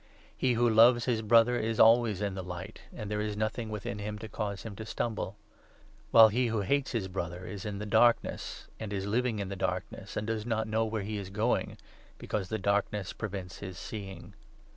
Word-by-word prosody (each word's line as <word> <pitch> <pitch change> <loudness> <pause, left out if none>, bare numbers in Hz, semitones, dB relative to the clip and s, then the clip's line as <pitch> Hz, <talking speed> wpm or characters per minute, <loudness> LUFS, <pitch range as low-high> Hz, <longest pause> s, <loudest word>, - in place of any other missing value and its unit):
He 130 -1 +1
who 120 +1 +3
loves 115 +2 +6
his 120 -3 +1
10 110 - -7
Brother 115 +2 +5
is 110 0 -1
always 115 -3 +5
in 100 -1 -1
the 95 - -4
Light, 90 +3 -7
and 105 -2 -7
there 105 0 0
is 105 -1 -3
nothing 110 +1 -2
within 105 -1 -4
him 105 +1 -4
to 110 +1 -7
cause 105 -3 -4
him 110 -3 -7
to 110 - -5
stumble; 110 -4 -3 0.7
while 110 -1 +9
he 120 +3 +1
who 110 -2 0
hates 140 +8 0
his 110 -5 -1
Brother 90 -2 -4
1 - - -9
1 - - -7
is 100 0 -7
in 105 -1 -3
the 105 - -5
Darkness, 120 +3 +2
and 110 -2 -5
is 95 -1 -2
living 115 +2 0
in 100 -2 -3
the 100 - -4
Darkness, - - -3
and 105 - -1
does 110 -1 -2
not 110 -1 -1
know 110 +1 +1
where 110 -2 -2
he 105 +1 -3
is 100 -2 -6
going, 110 +5 0 0.4
because 95 -4 -3
the 110 - -1
Darkness 100 -1 0
prevents 95 -4 -6
his 95 -2 -7
seeing. 95 -3 -7
105 Hz, 220 wpm, -30 LUFS, 100-115 Hz, 0.7 s, while